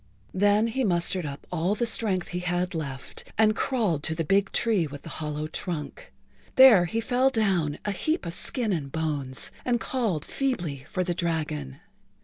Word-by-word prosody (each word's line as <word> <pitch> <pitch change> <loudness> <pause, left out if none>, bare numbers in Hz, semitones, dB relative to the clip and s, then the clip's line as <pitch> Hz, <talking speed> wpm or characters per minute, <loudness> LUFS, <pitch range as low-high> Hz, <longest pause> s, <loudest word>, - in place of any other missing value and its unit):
Then 205 +3 +3
he 260 +4 -1
mustered 175 -3 0
up 140 0 -8
all 180 +4 0
the 235 - 0
strength 210 -5 +1
he 180 - -3
had 180 +1 -1
left 140 -5 -6
and 215 0 +4
crawled 215 - 0
to 160 +1 -2
the 165 - -1
big 195 +5 +2
tree 210 -8 +2
with 145 0 -9
the - - -8
hollow 150 0 -3
trunk. 155 - -5 0.4
There 245 -9 +8
he 200 +7 -2
fell 250 +3 +2
down, 190 - +1
a 205 - 0
heap 310 - -1
of 170 - -4
skin 225 +2 -1
and 140 -5 -3
bones, 145 -5 -2
and 240 -1 +1
called 225 - -1
feebly 175 - -2
for 185 - -1
the 175 -1 -1
dragon. 155 - -3
180 Hz, 175 wpm, -26 LUFS, 155-220 Hz, 0.4 s, There